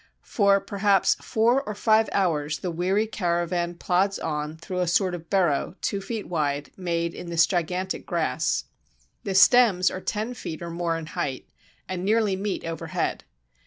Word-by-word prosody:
For, 200 Hz, -2 st, +3 dB
perhaps, 200 Hz, 0 st, +2 dB
four 235 Hz, +4 st, +2 dB
or 215 Hz, -6 st, -6 dB
five 220 Hz, +1 st, +3 dB
hours 155 Hz, -6 st, 0 dB
the 180 Hz, -, -4 dB
weary 185 Hz, +6 st, +1 dB
caravan 175 Hz, -3 st, -1 dB
plods 190 Hz, +3 st, +1 dB
on 150 Hz, 0 st, -3 dB
through 180 Hz, +3 st, -5 dB
a 180 Hz, -, +1 dB
sort 180 Hz, +2 st, +2 dB
of 170 Hz, -2 st, -7 dB
burrow, 180 Hz, -4 st, +1 dB
two 200 Hz, -, -2 dB
feet 215 Hz, +2 st, -5 dB
wide, 145 Hz, -4 st, -2 dB
made 170 Hz, -2 st, -2 dB
in 175 Hz, -, -8 dB
this 170 Hz, -1 st, +4 dB
gigantic 180 Hz, +1 st, -2 dB
grass. 155 Hz, -4 st, 0 dB, 0.6 s
The 195 Hz, -, -2 dB
stems 190 Hz, -3 st, +6 dB
are 185 Hz, -, -5 dB
ten 220 Hz, +5 st, -3 dB
feet 170 Hz, -8 st, -7 dB
or 170 Hz, -, -5 dB
more 170 Hz, -1 st, -1 dB
in 165 Hz, -, -6 dB
height, 140 Hz, -4 st, -4 dB, 0.4 s
and 185 Hz, -1 st, -4 dB
nearly 210 Hz, -1 st, +2 dB
meet 195 Hz, +1 st, -3 dB
overhead. 165 Hz, -1 st, -3 dB
180 Hz, 160 wpm, -25 LUFS, 165-200 Hz, 0.6 s, stems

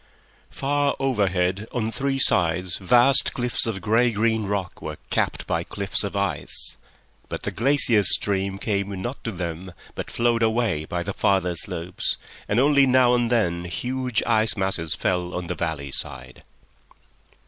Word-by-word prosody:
Far 145 Hz, +1 st, -1 dB
overhead, 100 Hz, -6 st, 0 dB
on 115 Hz, -3 st, -2 dB
three 135 Hz, +2 st, -2 dB
sides, 90 Hz, -7 st, +2 dB
vast 120 Hz, +7 st, +4 dB
cliffs 120 Hz, -1 st, +2 dB
of 100 Hz, -4 st, -3 dB
grey 115 Hz, +5 st, +2 dB
green 110 Hz, -1 st, 0 dB
rock 95 Hz, -3 st, -4 dB
were 75 Hz, -1 st, -6 dB
capped -, -, -1 dB
by -, -, -1 dB
cliffs -, -, -2 dB
of -, -, -5 dB
ice; -, -, +2 dB, 0.5 s
but -, -, -6 dB
the -, -, -3 dB
glacier 120 Hz, -2 st, +4 dB
stream 95 Hz, -1 st, +2 dB
came 100 Hz, -1 st, -3 dB
not 120 Hz, +8 st, -6 dB
to 115 Hz, -, -3 dB
them, 90 Hz, -1 st, -6 dB, 0.2 s
but -, -, -6 dB
flowed 120 Hz, -1 st, +1 dB
away 110 Hz, -8 st, 0 dB
by 85 Hz, +2 st, -3 dB
the 100 Hz, -, -4 dB
farther 95 Hz, -3 st, +1 dB
slopes, 85 Hz, +1 st, -2 dB, 0.3 s
and 105 Hz, -, +1 dB
only 140 Hz, 0 st, +4 dB
now 130 Hz, -1 st, +4 dB
and 120 Hz, -1 st, +1 dB
then 85 Hz, -7 st, 0 dB
huge 125 Hz, +5 st, -2 dB
ice 110 Hz, -2 st, +2 dB
masses 95 Hz, -4 st, -1 dB
fell 90 Hz, -1 st, -2 dB
on 90 Hz, 0 st, -4 dB
the 85 Hz, -, -3 dB
valley 80 Hz, -5 st, -4 dB
side. 65 Hz, -1 st, -4 dB
100 Hz, 155 wpm, -23 LUFS, 90-120 Hz, 0.5 s, vast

